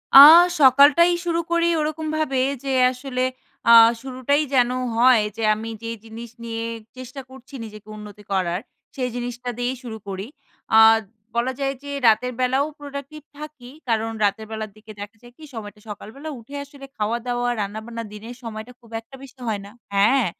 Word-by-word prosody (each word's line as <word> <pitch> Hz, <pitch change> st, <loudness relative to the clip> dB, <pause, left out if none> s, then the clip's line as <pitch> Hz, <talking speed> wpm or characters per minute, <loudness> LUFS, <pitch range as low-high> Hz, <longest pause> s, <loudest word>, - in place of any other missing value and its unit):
আ -, -, +13 dB, 0.4 s
সকালটাই 285 Hz, +6 st, +6 dB
শুরু 335 Hz, -1 st, 0 dB
করি 340 Hz, 0 st, +2 dB
ওরকমভাবে 310 Hz, -2 st, -1 dB, 0.2 s
যে 275 Hz, -, -2 dB, 0.2 s
আসলে 255 Hz, 0 st, -3 dB, 0.5 s
আ -, -, +9 dB, 0.3 s
শুরুটাই 265 Hz, +3 st, 0 dB
যেন 245 Hz, -2 st, +4 dB, 0.3 s
হয় 240 Hz, -2 st, +5 dB
যে 225 Hz, -, -3 dB
আমি 220 Hz, +2 st, -5 dB
যে 230 Hz, -, -4 dB, 0.2 s
জিনিস 230 Hz, +1 st, -9 dB
নিয়ে 230 Hz, 0 st, -4 dB, 0.3 s
চেষ্টা 255 Hz, +2 st, -8 dB
করছি 260 Hz, +1 st, -15 dB
নিজেকে 215 Hz, -1 st, -12 dB
উন্নতি 210 Hz, 0 st, -11 dB
করার 185 Hz, -1 st, 0 dB, 0.3 s
সেই 250 Hz, -2 st, -2 dB
জিনিসটা 245 Hz, 0 st, -5 dB
দিয়েই 245 Hz, +1 st, -1 dB
শুরু 225 Hz, -2 st, -7 dB
করি। 195 Hz, 0 st, -5 dB, 0.5 s
আ -, -, +8 dB, 0.6 s
বলা 240 Hz, +2 st, +1 dB
যায় 275 Hz, 0 st, 0 dB
যে 285 Hz, -, -7 dB, 0.2 s
রাতের 250 Hz, +3 st, +3 dB
বেলাও 260 Hz, +3 st, +2 dB
প্রোডাক্টিভ 285 Hz, +1 st, -8 dB, 0.2 s
থাকি 300 Hz, -5 st, -10 dB, 0.2 s
কারণ 225 Hz, -1 st, 0 dB
রাতের 210 Hz, +2 st, 0 dB
বেলার 220 Hz, -1 st, -5 dB
দিকে 215 Hz, 0 st, -13 dB
দেখা 205 Hz, +2 st, -9 dB
যায় 240 Hz, 0 st, -16 dB
কি? 315 Hz, -, -15 dB
সময়টা 210 Hz, -2 st, -8 dB
সকালবেলা 225 Hz, +9 st, -8 dB
উঠে 235 Hz, +5 st, -12 dB
আসলে 280 Hz, -1 st, -13 dB
খাওয়াদাওয়া 240 Hz, +3 st, -1 dB
রান্নাবান্না 220 Hz, +3 st, -5 dB
দিনের 225 Hz, +4 st, -9 dB
সময়টা 225 Hz, +1 st, -7 dB
খুব 235 Hz, -2 st, -20 dB
একটা 230 Hz, +4 st, -15 dB
বেশি 265 Hz, 0 st, -14 dB
হয় 205 Hz, -2 st, -2 dB
না 200 Hz, -, -12 dB, 0.2 s
হ্যাঁ 220 Hz, +6 st, +4 dB
245 Hz, 160 wpm, -22 LUFS, 220-275 Hz, 0.6 s, আ